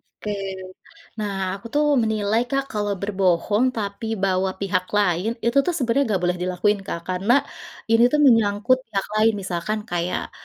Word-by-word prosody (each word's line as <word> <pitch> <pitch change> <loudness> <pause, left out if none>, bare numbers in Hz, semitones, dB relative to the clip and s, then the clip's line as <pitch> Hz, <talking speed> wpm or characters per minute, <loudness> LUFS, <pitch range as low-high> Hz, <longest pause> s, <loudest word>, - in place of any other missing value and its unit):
Oke. 210 - -8 0.9
Nah, 210 -2 -2 0.3
aku 200 - -12
tuh 295 +1 +3 0.2
menilai 220 0 +1
Kak, 275 0 0
kalau 205 -1 -1
berbohong, 200 +2 +1
tapi 205 +1 -4 0.2
bawa 190 0 +1
pihak 185 -2 0
lain, 200 +3 +1
itu 235 +4 +2
tuh 355 - 0
sebenarnya 265 -1 +1
enggak 185 - -1
boleh 180 0 0
dilakuin 185 +3 +1
Kak, 170 - -4
karena 190 +6 +2 0.6
ini 225 +1 +5
tuh 300 - +3
menyangkut 230 -1 +4
pihak 200 -3 -2 0.2
lain, 220 +1 +4
misalkan 195 +1 -3
kayak, 175 0 -2
205 Hz, 155 wpm, -22 LUFS, 185-225 Hz, 0.9 s, ini